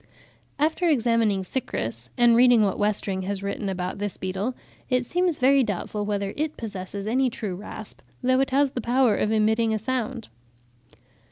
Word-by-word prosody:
After 320 +4 +1
examining 230 -7 +2
Cychrus, 120 - -4
and 240 -1 +5
reading 245 -2 +6
what 195 -2 0
Westring 205 -2 0
has 200 0 -3
written 200 0 -3
about 185 0 -4
this 205 -1 -3
beetle, 190 +7 -3 0.3
it 250 -1 +1
seems 355 +2 0
very 270 +1 +4
doubtful 205 0 -3
whether 200 -1 -2
it 305 +1 -2
possesses 200 -2 -6
any 255 +4 +2
true 210 -4 -5
rasp, 210 +2 -9 0.2
though 255 +1 +3
it 270 - +1
has 275 0 +2
the 245 - -4
power 240 -1 +3
of 210 - 0
emitting 220 +1 +2
a - - +1
sound. 245 +1 -3
220 Hz, 165 wpm, -25 LUFS, 200-255 Hz, 0.3 s, reading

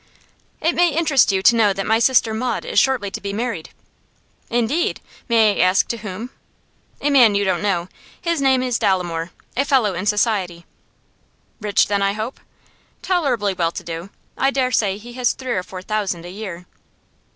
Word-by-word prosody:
'It 330 +2 +2
may 350 0 +3
interest 305 -7 +3
you 190 -1 0
to 235 - +6
know 210 -3 +3
that 195 0 -4
my 220 +1 +2
sister 235 -2 +3
Maud 235 +1 -2
is - - +2
shortly 255 -7 +1
to - - -6
be 200 - -4
married.' 220 -6 -3 0.8
'Indeed! 240 +8 0 0.3
May 220 -3 +4
I - - +6
ask 185 +1 +3
to 235 - -2
whom?' 210 +4 -7 0.7
'A 290 - +1
man 240 -7 +6
you 200 - +2
don't 190 - 0
know. 180 -4 0 0.3
His 335 -4 -1
name 265 -2 +3
is 250 -2 -1
Dolomore 175 -3 0 0.3
a 275 - +2
fellow 255 -8 +2
in 185 +3 -4
society.' 205 -5 0 0.9
'Rich, 210 -2 +2
then, 200 -1 0
I 195 0 +1
hope?' 220 +5 -5 0.6
'Tolerably 255 - 0
well 170 -3 0
to - - -7
do. 170 +2 -6 0.3
I 270 - +3
dare 265 -2 0
say 205 -4 +1
he 240 +3 -11
has 250 0 +1
three 260 -1 -6
or 185 - 0
four 185 0 -9
thousand 195 -5 -2
a 175 - -8
year! 185 -3 -7
215 Hz, 185 wpm, -20 LUFS, 190-255 Hz, 0.9 s, to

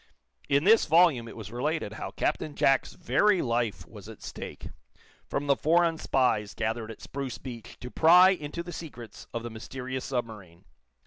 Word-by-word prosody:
In 140 +1 +3
this 220 +4 +5
volume 160 -7 +4
it 115 - -10
was 105 -2 -8
related 135 -1 -2
how - - -5
Captain 150 - -2
Jack's 135 -2 +2
very 190 +2 +2
life 115 -3 -1
was - - -12
at - - -12
stake, - - -8 0.6
from 140 - -2
the 140 -1 +3
foreign 165 +1 +2
spies 110 -6 +1
gathered 115 0 -2
at 115 - -10
Spruce 135 -2 -5
Beach 120 -4 -9
to 125 - -8
pry 180 +3 +7
into 170 -2 -4
the 175 0 -8
secrets 120 -10 -9
of 115 - -4
the 120 - -6
mysterious 130 +3 -6
submarine. 105 -8 -5
130 Hz, 170 wpm, -28 LUFS, 115-160 Hz, 0.6 s, pry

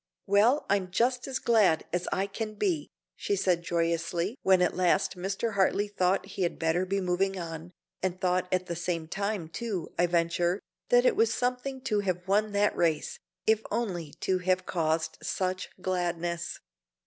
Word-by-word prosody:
"Well, 220 +8 +4
I'm 195 -2 +1
just 245 +7 +1
as 265 -1 -1
glad 210 -9 +3
as 180 0 -1
I 190 - +1
can 215 +2 -5
be," 325 - 0 0.3
she 405 - -1
said 180 - +1
joyously 170 +3 -1
when 190 -1 +4
at 180 - +1
last 185 +2 +2
Mr. 195 +5 -2
Hartley 200 +1 +2
thought 195 -2 +1
he 195 0 -7
had 175 - 0
better 165 +3 +1
be 195 +1 0
moving 190 +1 0
on, 165 -1 -6 0.3
and 185 -1 -1
thought 180 -1 0
at 185 0 +1
the 170 -1 -4
same 170 -1 -2
time, 200 -1 -2
too, 195 0 -4
I 175 - +4
venture, 175 +2 +1 0.3
that - - +5
it - - +4
was 450 +1 +3
something 250 +2 -2
to 215 -5 0
have 185 -2 -2
won 210 +2 +2
that 205 +1 +2
race, 160 -3 0 0.3
if 220 0 +3
only 185 -9 -2
to 185 -1 +1
have 185 0 +1
caused 160 -2 -1
such 185 0 -2
gladness. 175 -2 -2
185 Hz, 170 wpm, -29 LUFS, 175-205 Hz, 0.3 s, that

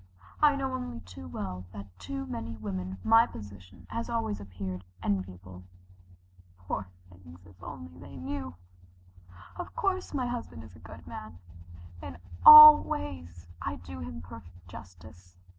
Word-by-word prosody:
I 295 -1 +5
know 265 -1 -3
only 250 - -5
too 90 -2 -11
well 90 +1 -6
that 100 -1 -8 0.2
to 90 0 -4
many 115 +4 -6
women 95 -3 -5
my 225 +1 +5
position 100 -5 -12
has 230 +1 -4
always 225 - -2
appeared 95 -2 -7 0.2
enviable. 95 -2 -4 1.0
Poor 95 +2 -5 0.2
things, 90 0 -16
if 95 -1 -19
they - - -13
only 85 +1 -11
knew! 90 0 -6 1.0
Of 355 - -8
course, 390 -6 -1
my 265 -4 -2
husband 240 - -6
is 105 -5 -14
a - - -15
good 85 0 -13
man. 90 +3 -9 0.6
In 90 -4 -8 0.3
all 305 0 +12
ways 85 -3 -7
I - - -3
do 85 +1 -10
him 80 -1 -8
perfect 90 +1 -14
justice. 90 -1 -14
95 Hz, 140 wpm, -29 LUFS, 90-110 Hz, 1.0 s, all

